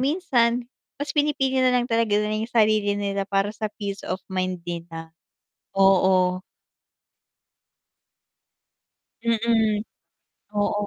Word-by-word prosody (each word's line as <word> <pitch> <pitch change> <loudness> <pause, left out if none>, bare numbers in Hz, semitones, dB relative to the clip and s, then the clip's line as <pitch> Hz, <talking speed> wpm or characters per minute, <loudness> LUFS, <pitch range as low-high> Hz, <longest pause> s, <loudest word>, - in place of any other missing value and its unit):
minsan 250 -6 +1 0.3
mas 290 +1 -4
pinipili 270 -3 +1
nalang 250 -1 +3
talaga 230 -3 +1
nila 210 0 0
yung 225 - -3
sarili 215 -3 +2
nila 200 -1 -2
para 200 +1 0
sa 215 -1 -4
peace 200 -1 -6
of 185 - -3
mind 185 -2 -2
nila, 165 -1 -7 0.7
oo. 185 -1 +4 2.8
Mm. 225 -2 +1 0.7
Oo, 205 0 0
210 Hz, 100 wpm, -24 LUFS, 195-235 Hz, 2.8 s, oo